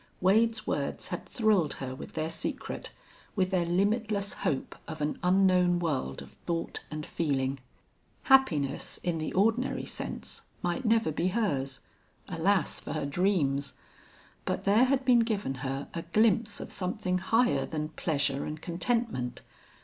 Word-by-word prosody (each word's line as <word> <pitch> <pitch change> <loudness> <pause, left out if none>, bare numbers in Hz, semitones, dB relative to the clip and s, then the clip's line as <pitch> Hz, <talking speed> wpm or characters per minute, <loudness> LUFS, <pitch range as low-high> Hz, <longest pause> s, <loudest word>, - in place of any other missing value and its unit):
Wade's 215 +3 +3
words 140 -1 -2
had 175 - -5
thrilled 210 - +2
her 130 -1 -5
with 130 - -9
their 155 +1 -2
secret, - - -4 0.4
with 185 -2 +1
their 175 -2 +1
limitless 205 +2 +1
hope 135 - -1
of 160 -1 -6
an 150 0 -1
unknown 180 -1 +4
world 140 - -2
of - - -14 0.2
thought 165 -1 -2
and 155 0 -5
feeling. 135 -4 -1 0.6
Happiness, 180 - +3
in 170 -2 0
the 155 - -2
ordinary 225 +6 +2
sense, - - -5 0.2
might 175 +8 -1
never 225 -6 +3
be 165 +4 0
hers. 145 - 0 0.5
Alas 180 0 +1
for - - -6
her 155 -3 -2
dreams! 140 -4 +1 0.7
But - - -2
there 210 +5 +5
had 265 0 +1
been 245 -2 +6
given 215 - 0
her 135 0 -3
a 170 - -3
glimpse 215 +5 +2
of - - -6
something 185 0 -1
higher 190 - +2
than 155 -1 -3
pleasure 140 -4 0
and 155 +1 -5
contentment. 175 - -1
175 Hz, 145 wpm, -29 LUFS, 150-210 Hz, 0.7 s, been